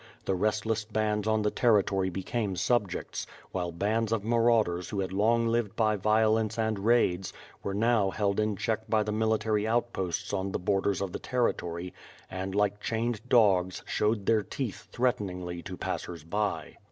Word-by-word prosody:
The - - +1
restless 110 +3 0
bands 105 -1 -1
on 110 -1 +2
the 105 - +1
territory 100 -5 +2
became 95 +2 -2
subjects; 105 -2 -1 0.2
while 90 -2 -2
bands 110 +6 0
of 110 -3 0
marauders 115 -6 +2
who 100 - -3
had 95 -1 -2
long 115 +4 +3
lived 115 -3 0
by 110 -2 +2
violence 110 +2 +2
and 110 -2 0
raids, 95 -4 +2 0.3
w^ere 100 - -2
now 110 -2 +3
held 100 0 0
in 105 -1 +1
check 110 +2 -2
by 110 -1 +3
the 105 - -3
military 110 -1 +1
outposts 110 -7 -1
on 95 -1 -2
the - - +1
borders 100 +1 0
of 100 -2 -2
the - - -5
territory, 90 -8 -1 0.4
and 95 +1 -4
like 105 0 +1
chained 115 0 -1
dogs, 95 -6 +3
showed 105 -1 0
their 110 0 +3
teeth 120 0 -5
threateningly 90 -8 -1
to 90 +1 -7
passers 85 -3 -4
by. 100 +5 -2
105 Hz, 165 wpm, -29 LUFS, 95-110 Hz, 0.4 s, long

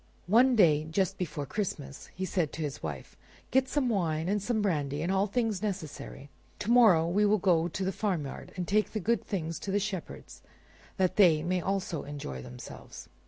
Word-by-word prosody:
One 245 +7 +5
day, 155 -7 +4
just 190 +3 0
before 150 -5 -3
Christmas, 145 -6 -5
he 190 - -2
said 175 -5 -1
to 160 - -4
his 145 -1 -4
wife, - - -6 0.4
"Get 260 0 +3
some 285 -4 +1
wine, 165 -7 0
and 205 +1 +1
some 225 +2 0
brandy, 150 -7 -1
and 175 - 0
all 195 +1 +2
things 215 -2 -1
necessary; 155 -8 -5 0.3
to 210 - -2
morrow 210 -10 +6
we 195 +5 +2
will 210 +1 +4
go 175 -4 +2
to 185 +3 -3
the 190 - 0
farmyard 175 -9 -3
and 180 -2 -3
take 215 +1 +1
the 215 - -1
good 230 +5 0
things 165 -5 -3
to - - -6
the 200 +1 +2
shepherds 195 -4 -6 0.6
that 185 -2 +1
they 165 -7 +5
may 180 +1 0
also 185 -4 -2
enjoy 140 - -6
themselves." - - -10
185 Hz, 190 wpm, -29 LUFS, 160-210 Hz, 0.6 s, morrow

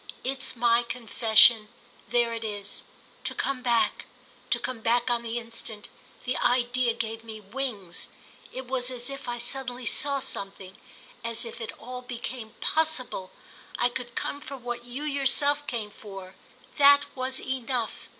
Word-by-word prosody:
It's 265 +1 0
my 235 0 +4
confession—there 230 0 +3
it 230 0 -4
is. 205 -2 -5 0.4
To - - -3
come 275 -2 -1
back, 240 -2 +2 0.4
to - - +4
come 255 -2 -4
back 240 +2 +2
on 240 -1 +2
the 235 0 -3
instant—the 230 +1 -6
idea 245 -1 +2
gave 225 -1 -3
me 220 -1 -8
wings. 210 -4 -4 0.4
It 260 0 -6
was 250 0 +2
as 250 +1 -2
if 275 -1 -7
I 240 - -2
suddenly 250 0 -1
saw 280 +5 +4
something—as 225 +1 -6
if 230 +1 -8
it 225 - -4
all 250 +1 -6
became 240 -2 -6
possible. 280 -12 +1 0.5
I 245 - +3
could 245 -1 -6
come 285 - -2
for 275 -1 -7
what 240 -1 -5
you 250 +4 -5
yourself 285 0 +3
came 220 -4 -3
for: 195 -3 -9 0.5
that 285 0 +9
was 260 0 -1
enough. 255 -2 -2
240 Hz, 140 wpm, -28 LUFS, 225-260 Hz, 0.5 s, that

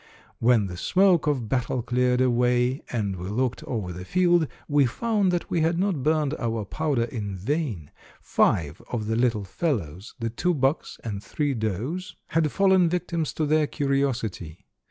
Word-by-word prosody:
"When 115 -3 +4
the 90 -2 -6
smoke 180 - +3
of 130 -6 0
battle 125 0 -1
cleared 125 +1 +1
away, 125 +1 +2
and 100 -5 -2
we 90 +2 -5
looked 125 +3 -1
over 100 -7 -3
the 90 +1 -7
field, 175 - +3 0.2
we 145 -2 +4
found 210 - +1
that 175 -1 -2
we 170 - +1
had 165 +2 +2
not 185 -6 0
burned 150 0 +1
our 115 -3 -2
powder 145 +1 0
in 105 -4 -4
vain. 110 - -2 0.3
Five 80 -1 +1
of 115 -4 -2
the 110 +1 -1
little 115 -3 +1
fellows, 95 - -3
the 115 -2 -3
two 180 +9 0
bucks 135 +2 0
and 105 -3 -5
three 145 -2 -1
does, 115 - -3
had 155 -2 +1
fallen 190 -3 +4
victims 170 -3 -1
to 155 - -1
their 155 0 +2
curiosity. 125 - -2
125 Hz, 165 wpm, -25 LUFS, 110-155 Hz, 0.3 s, When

